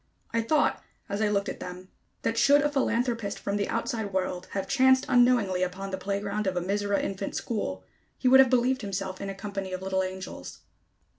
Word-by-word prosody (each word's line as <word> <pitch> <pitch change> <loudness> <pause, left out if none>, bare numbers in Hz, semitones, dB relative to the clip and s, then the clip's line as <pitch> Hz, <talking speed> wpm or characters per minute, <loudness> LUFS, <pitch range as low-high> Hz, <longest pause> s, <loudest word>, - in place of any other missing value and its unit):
I 230 - +2
thought, 300 +7 +1 0.3
as 200 +2 -2
I 215 - +3
looked 200 0 0
at - - -5
them, 180 +1 -8 0.3
that 225 - 0
should 285 +5 +5
a 295 - +1
philanthropist 235 -6 0
from 200 - -3
the 200 - -1
outside 230 -3 -2
world 185 -1 -2
have 195 -1 -2
chanced 260 +3 +4
unknowingly 245 -7 +3
upon 185 +2 -3
the 190 - -2
playground 200 +1 -2
of 185 -1 -1
a - - +3
Mizora 200 +2 0
infant 195 0 -4
school, 95 - -3 0.3
he 255 - 0
would 265 +1 +8
have 265 -1 +7
believed 255 +1 +2
himself 195 -2 -4
in 200 - -4
a 195 - -5
company 195 -2 -5
of 185 0 -4
little 190 0 0
angels. 185 0 -6
200 Hz, 200 wpm, -27 LUFS, 190-235 Hz, 0.3 s, would